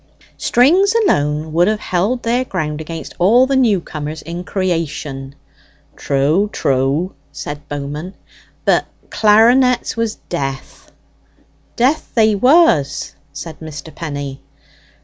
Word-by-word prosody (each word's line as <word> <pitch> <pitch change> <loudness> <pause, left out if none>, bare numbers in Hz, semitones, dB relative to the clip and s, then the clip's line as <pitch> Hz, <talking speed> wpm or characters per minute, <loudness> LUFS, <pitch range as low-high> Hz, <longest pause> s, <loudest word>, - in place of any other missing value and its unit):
"Strings 355 - +3
alone 155 - +1
would 175 +2 +3
have 215 0 +1
held 210 +8 -1
their 240 +2 +1
ground 155 -9 -3
against 165 +1 -7
all 225 +8 +5
the 270 +1 0
new 230 -7 +3
comers 155 -1 -6
in 170 +3 -6
creation." 155 -8 -3 0.6
("True, 150 +9 +1
true!" 140 +7 0 0.2
said 145 0 -7
Bowman.) 145 +6 -5 0.5
"But - - +3 0.3
clarinets 235 +4 +4
was 230 -2 -1
death." 135 -5 -5 0.8
("Death 265 +6 0
they 220 -2 +4
was!" 250 - +3 0.2
said 145 +3 -8
Mr. 155 -1 -9
Penny.) 145 -4 -6
170 Hz, 110 wpm, -17 LUFS, 145-230 Hz, 0.8 s, all